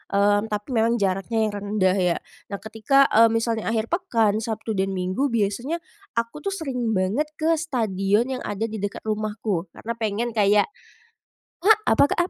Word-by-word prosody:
mmm, 205 +1 +3
tapi 210 -1 -4
memang 230 0 +2
jaraknya 200 +2 0
yang 215 - 0
rendah, 200 -2 +1
ya. 180 -2 +2 0.3
Nah, 200 - -4
ketika, 225 +6 +3
eee, 230 +1 +7
misalnya 225 -1 -1
akhir 225 +2 -1
pekan, 230 - +1
Sabtu 225 0 -4
dan 195 -1 -1
Minggu, 185 +10 0
biasanya 235 +9 -1 0.3
aku 230 +5 -2
tuh 395 +5 -3
sering 250 - -2
banget 205 +12 0
ke 320 +1 +1
stadion 225 - 0
yang 255 - -4
ada 205 +2 -3
di 220 -2 -3
dekat 200 0 -4
rumahku, 210 -4 -2
karena 230 - -5
pengen 225 +2 -1
kayak 210 - +3 1.0
ah, 440 - +9 0.2
apa, - - +5
Kak? - - -1
220 Hz, 165 wpm, -24 LUFS, 205-235 Hz, 1.0 s, ah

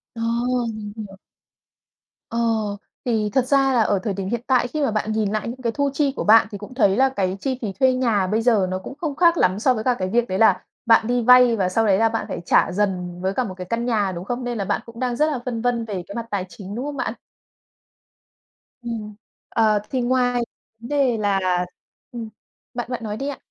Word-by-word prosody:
Ờ, 230 - -6 0.5
mình 210 -1 -7
hiểu. 200 -3 -8 1.1
Ờ, 230 - -4 0.7
thì 220 -4 0
thật 260 -2 +2
ra 270 -1 +3
là 235 - +4
ở 205 -3 +2
thời 205 - -1
điểm 190 0 -4
hiện 235 -1 -2
tại 250 -2 +3
khi 305 +3 -3
mà 275 - +1
bạn 215 0 -1
nhìn 215 -2 0
lại 215 +1 -2
những 250 +2 -6
cái 235 -2 0
thu 280 +4 0
chi 280 -1 +1
của - - -2
bạn 220 0 +6
thì 205 - -5
cũng 205 +5 -10
thấy 200 -6 +3
là 270 0 +4
cái 195 -7 -2
chi 260 +1 -2
phí 215 -4 -2
thuê 260 -1 +4
nhà 230 -7 +1
bây 215 +4 +1
giờ 220 -6 +3
nó 185 0 -2
cũng 190 - -8
không 300 -3 -3
khác 340 +1 +4
lắm 185 -4 +2
so 255 +3 +3
với 220 - -3
cả 255 - +3
cái 185 0 -1
việc 235 +3 +1
đấy 185 - -2
là 225 - +4 0.2
bạn 225 -1 +5
đi 245 0 +1
vay 250 0 +6
và 190 -4 0
sau 225 +4 +1
đấy 195 -2 +4
là 225 +1 +3
bạn 225 0 -2
phải - - -4
trả - - +3
dần 180 -3 -2
với 190 +1 0
cả 255 - 0
một 195 -6 -5
cái 180 - -6
căn 235 +1 -1
nhà, 210 -5 +1
đúng 175 +1 -6
không? 245 +2 -3
Nên 240 -1 -3
là 200 - -2
bạn - - -1
cũng 230 0 -12
đang 250 -1 -1
rất 305 +4 +2
là 265 - -2
phân 230 -3 -3
vân 240 -1 0
về 195 -5 -4
cái 200 - -8
mặt 235 -1 -3
tài 190 -2 -1
chính, 195 +4 -9
đúng 255 +4 -3
không 290 -1 -5
bạn? - - -2 1.7
Ừm, 220 -3 -6 0.3
ờ, 215 -2 +3
thì 255 -2 -1
ngoài 245 0 +1 0.4
v 230 - -12
đề 275 -5 +2
là 205 -2 +1 0.7
ừm, 230 -3 -6 0.4
bạn 240 0 -4
bạn 235 -2 -4
nói 210 -1 -4
đi 275 - -4
ạ. 280 - -5
230 Hz, 245 wpm, -22 LUFS, 205-250 Hz, 1.7 s, bạn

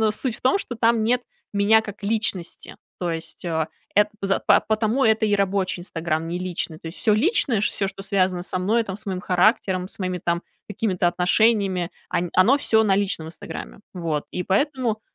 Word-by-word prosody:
но 215 -1 +3
суть 230 +1 -2
в - - -12
том, 260 +9 +3
что 245 - -5
там 230 0 +3
нет 245 +3 +2 0.3
меня 205 +2 +4
как 205 -1 -9
личности. 205 -5 -2 0.2
То 175 -2 -1
есть, 165 +1 -6
э, 160 -2 0 0.3
эт 210 0 +5
поза 195 0 0
па - - +6
потому 220 +4 +1
это 220 0 +3
и 205 - +2
рабочий 195 -2 0
"Инстаграм", 165 -2 -2
не 175 - -3
личный. 175 -3 -4
То - - -11
есть, 165 - -7
всё 215 - +3
личное, 250 - +2
ш - - +2
всё, 195 - -1
что 195 0 -8
связано 185 -2 +1
со 185 0 -2
мной, 225 +5 +2
там, 195 -1 -5
с - - -7
моим 185 -2 -2
характером, 185 0 +2
с - - -7
моими 185 -1 -2
там 170 +1 -1 0.3
какими-то 190 -4 0
отношениями, 185 0 +2 0.2
они, 175 0 -1
оно 215 +10 +5
всё 220 -5 +3
на 195 - +3
личном 190 -5 -1
"Инстаграме". 170 +4 -8
Вот, 165 -5 -3
и 180 - -3
поэтому, 240 +1 0
195 Hz, 200 wpm, -23 LUFS, 180-220 Hz, 0.3 s, па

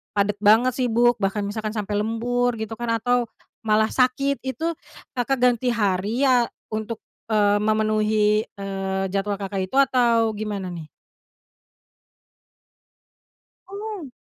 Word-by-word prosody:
padat 200 0 +1
banget, 220 +5 +5
sibuk, 240 -1 +3
bahkan 200 +1 -1
misalkan 215 +2 -4
sampai 205 -1 -2
lembur 240 +2 0
gitu 220 0 -5
kan, 240 - -3
atau 245 0 +2 0.4
malah 215 0 +3
sakit, 270 +2 +1
itu 265 +6 -2 0.5
Kakak 250 +1 0
ganti 245 0 +3
hari 205 +4 0
ya 250 -3 +4 0.2
untuk, 220 +1 -4 0.3
eee, 205 -2 +3
memenuhi, 215 0 +2
eee, 195 -1 -4
jadwal 200 +1 -1
Kakak 195 -1 -4
itu, 225 - -9
atau 235 -4 +3
gimana, 205 -3 -4
nih? 165 -3 -8 2.8
Oh! 400 -7 -7
220 Hz, 120 wpm, -23 LUFS, 205-245 Hz, 2.8 s, banget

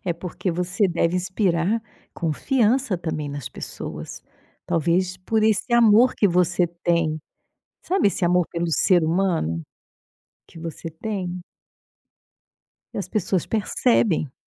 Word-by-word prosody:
É 180 - 0
porque 180 +2 -4
você 180 +3 0
deve 170 0 +1
inspirar 185 +2 0 0.3
confiança 230 - +1
também 155 -3 -4
nas 140 -3 -5
pessoas, - - -7 0.4
talvez 175 +3 +1
por 215 +4 0
esse 220 +3 +1
amor 235 +1 +6
que 205 - +3
você 175 0 +2 0.2
tem, 165 -3 +1 0.7
Sabe 380 - +2
esse 200 - -1
amor 180 0 +3
pelo 170 0 -2
ser 175 +1 +4
humano 160 - 0 0.9
que - - -13
você 165 0 -6
tem? 180 0 -4 1.5
E - - -3
as - - -4
pessoas 190 -4 0
percebem. 215 - +1
180 Hz, 120 wpm, -23 LUFS, 165-205 Hz, 1.5 s, amor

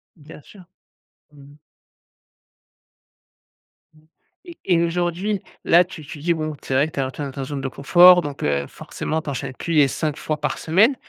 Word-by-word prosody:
Bien 150 -1 -14
sûr. 190 +6 -16 0.7
Mmh. 140 -1 -16 2.4
Mmh 155 - -23 0.5
et 335 - -11
et 175 -3 +3
aujourd'hui, 175 +4 -1 0.2
là 175 +2 +6
tu 170 -4 -11
tu 150 +1 -9
dis, 170 +4 +1
bon, 155 -2 -4
c'est - - -4
vrai 140 +4 +3
que - - -13
tu - - -4
as 130 0 -3
tu 145 - -9
es - - -2
dans 135 - -6
ta 135 0 -6
zone 140 +1 -5
de 135 - -3
confort 175 +7 +6
donc, 145 -3 -7
heu, 70 -1 0
forcément, 160 +1 -5
tu - - -7
enchaînes 135 -1 -5
plus 165 +6 -5
les 150 -3 +5
5 150 +1 -2
fois 155 -1 -4
par 150 -2 -2
semaine, 205 - +3
155 Hz, 190 wpm, -21 LUFS, 140-175 Hz, 2.4 s, là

